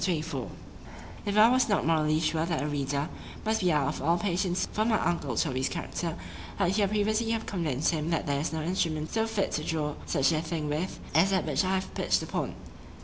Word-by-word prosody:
XXIV 165 -3 -1 0.8
IF 205 +1 0
I 220 +2 +8
was 255 -2 +3
not 205 - +2
morally 155 -1 +3
sure 160 0 +1
that 165 -1 -1
the - - -1
reader 145 0 -1 0.4
must 220 0 +1
be 180 -2 +3
out 150 -3 +2
of 145 - -3
all 165 +5 +3
patience 180 0 0
for 215 - +2
my 220 -1 +2
uncle 145 -8 -1
Toby's 130 0 0
character,——I 90 - -5
would 175 - +3
here 205 -2 +3
previously 215 +2 +1
have 225 -1 -1
convinced 160 -7 0
him 160 -1 -2
that 165 -2 0
there 140 -1 0
is 150 - -1
no 160 -1 -2
instrument 160 -3 -1
so 225 0 +1
fit 220 -3 -1
to 150 - -1
draw 155 -2 -1
such 135 +4 +3
a 155 -1 +1
thing 160 -2 -3
with, 155 +6 -2
as 165 +6 +5
that 190 -2 +1
which - - +1
I 190 +1 +1
have 190 0 -3
pitch'd - - +1
upon. - - -3
165 Hz, 215 wpm, -29 LUFS, 150-195 Hz, 0.8 s, I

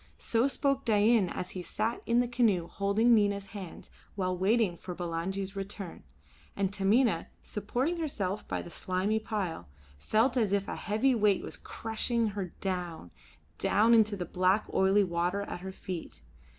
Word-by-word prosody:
So 230 +3 +1
spoke 275 0 0
Dain 215 -2 +4
as 180 - -5
he 185 - -5
sat 220 +6 -2
in 235 +1 +4
the 245 - 0
canoe 230 -8 +2
holding 200 +6 +2
Nina's 200 -2 +2
hands 190 -5 -8 0.2
while 185 -2 0
waiting 195 0 +2
for 180 +1 -7
Bulangi's 185 +3 -3
return; 195 -2 -6 0.5
and 195 -1 -1
Taminah, 200 -1 +2 0.2
supporting 250 - -2
herself 210 - -3
by - - -2
the 175 - -10
slimy 190 +5 0
pile, 195 - -3 0.3
felt 230 - +2
as 215 -5 +2
if 200 -1 +1
a - - -3
heavy 220 +6 +1
weight 210 -4 +3
was - - -5
crushing 225 0 -2
her 200 -2 -3 0.2
down, 175 - -3 0.5
down 225 +3 +4
into 215 -2 +5
the 180 - -3
black 185 +4 +2
oily 195 +2 +4
water 175 +2 0
at 190 - -6
her 190 +1 -5
feet. 185 -3 -7
200 Hz, 160 wpm, -30 LUFS, 185-225 Hz, 0.5 s, into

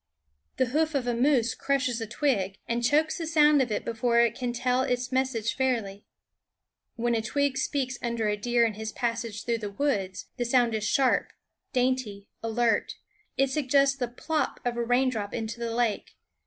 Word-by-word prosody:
The 260 - +3
hoof 315 0 +1
of 265 -3 0
a 245 - 0
moose 245 -1 +2
crushes 255 -4 -1
a 225 - -3
twig, 205 -6 0
and 235 +1 -1
chokes 305 +7 +2
the 330 - -3
sound 300 -3 +5
of 245 -4 -1
it 210 - -2
before 235 +1 +1
it 235 -1 +4
can 245 0 -3
tell 250 +1 +1
its 250 -1 -1
message 260 -4 0
fairly. 225 -7 -1 0.9
When 240 0 0
a 225 - +1
twig 280 +4 0
speaks 270 -2 -2
under 235 -2 -1
a 210 - +1
deer 235 +3 +2
in 225 - -1
his 220 +1 -5
passage 230 -3 -3
through 235 -1 0
the 210 -2 -4
woods, 200 -6 -2
the 240 - -1
sound 240 -1 +3
is 215 -1 -1
sharp, 265 +2 +2 0.4
dainty, 250 -6 -1
alert. 230 +1 0 0.4
It 270 0 +2
suggests 275 -1 +3
the 255 -3 -2
plop 305 +6 -2
of 245 -1 0
a 235 - -1
raindrop 245 -3 0
into 225 0 -4
the 235 -1 -2
lake. 235 -3 -1
240 Hz, 180 wpm, -27 LUFS, 225-265 Hz, 0.9 s, sound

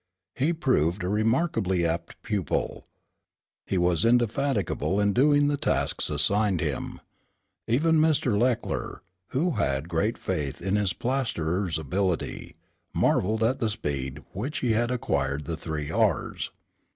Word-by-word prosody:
He 145 +6 +1
proved 100 - +1
a 90 - -1
remarkably 110 - +1
apt 85 +1 -3
pupil. 100 -8 -2 0.8
He 95 - 0
was 90 -2 +2
indefatigable 120 - +1
in 100 -1 +2
doing 145 +3 +4
the 145 0 +1
tasks - - 0
assigned 95 +6 +2
him. - - -3 0.7
Even 155 +7 +3
Mr. 155 -7 +3
Leckler, 120 -2 -1 0.2
who 165 +7 0
had 75 - -1
great 100 +7 0
faith 75 -7 -3
in 95 +3 -1
his 105 -3 +1
plasterer's 100 - -1
ability, 90 +4 -2 0.4
marveled 110 +4 +2
at 125 +4 +1
the 115 - +1
speed 70 - -4
which 125 - -3
he 120 - +2
had 120 +2 +1
acquired 70 - -1
the 85 - -3
three 80 -2 -4
R's. 105 -5 0
105 Hz, 130 wpm, -27 LUFS, 85-125 Hz, 0.8 s, doing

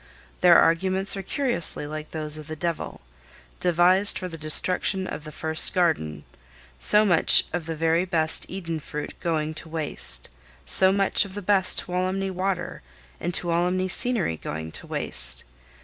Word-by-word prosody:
Their 175 -2 +6
arguments 190 +4 +2
are 195 - -5
curiously 235 - 0
like 155 +1 -7
those 155 -1 -1
of 155 -1 -9
the 155 - -6
devil, 170 - -5 0.6
devised 180 +3 +2
for 185 - -5
the 170 - -9
destruction 180 +4 +2
of 155 - -7
the 155 - -8
first 160 +1 +3
garden—so 75 - 0
much 175 -5 +4
of 170 -2 -4
the 165 - -4
very 165 +3 0
best 160 -3 -2
Eden 170 -4 -5
fruit 150 0 -7
going 155 -2 -2
to 160 - -7
waste; 160 -2 -2 0.4
so 190 0 +6
much 195 +1 +2
of 200 -2 -11
the 205 - -6
best 190 -1 +3
Tuolumne 185 +2 -3
water 185 0 -4 0.4
and 175 - -3
Tuolumne 180 +2 -1
scenery 200 - 0
going 80 +1 -7
to - - -8
waste. - - 0
170 Hz, 150 wpm, -24 LUFS, 155-185 Hz, 0.6 s, Their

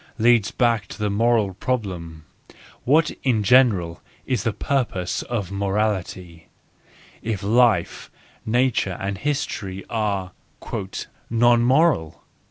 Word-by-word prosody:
leads 115 -2 +4
back 115 -4 +1
to - - -10
the 105 -1 -1
moral 110 -2 +2
problem: 90 -8 -4 0.6
What 155 +5 +3
in 115 -6 +1
general 100 -8 +3 0.2
is 125 -6 -1
the 115 - 0
purpose 105 -8 -2
of 105 -6 -4
morality, 95 -4 -2 0.7
if 110 -3 -3
life, 115 +2 +2 0.3
nature, 115 -5 0
and 100 0 -3
history 105 -10 -3
are 100 -5 -1 0.5
" 95 - -10
non 120 +1 +4
moral 125 - +2
105 Hz, 110 wpm, -22 LUFS, 95-120 Hz, 0.7 s, leads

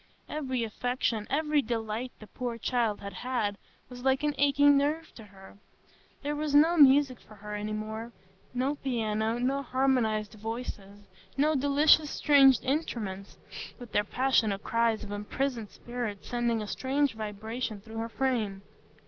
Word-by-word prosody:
Every 260 -5 -2
affection, 230 -1 -2
every 300 +1 +2
delight 230 +1 -3
the 215 - -11
poor 240 +1 -5
child 230 -2 0
had 200 -1 -7
had, 215 -1 -2 0.3
was 245 0 -10
like 265 +2 +2
an 295 0 +1
aching 285 0 +5
nerve 300 +4 0
to 220 - -12
her. 195 0 -16 0.6
There 295 +1 -1
was 295 -1 -1
no 320 +4 +6
music 275 -4 +6
for 215 - -16
her 210 +1 -8
any 210 +1 -3
more,—no 220 +4 -5
piano, 225 -3 0
no 265 +3 0
harmonised 250 -6 +1
voices, 210 -2 -7 0.3
no 300 +3 +3
delicious 290 +2 +4
stringed 275 -4 +5
instruments, 220 -9 -3 0.4
with 245 -3 -11
their 205 - +2
passionate 220 -4 +1
cries 230 -1 +1
of 205 - -8
imprisoned 225 +2 -3
spirits 240 -5 -6
sending 235 -2 0
a - - -7
strange 275 +4 0
vibration 220 +1 -5
through 220 +2 -10
her 225 +1 -3
frame. 225 -7 -1
240 Hz, 145 wpm, -29 LUFS, 215-270 Hz, 0.6 s, no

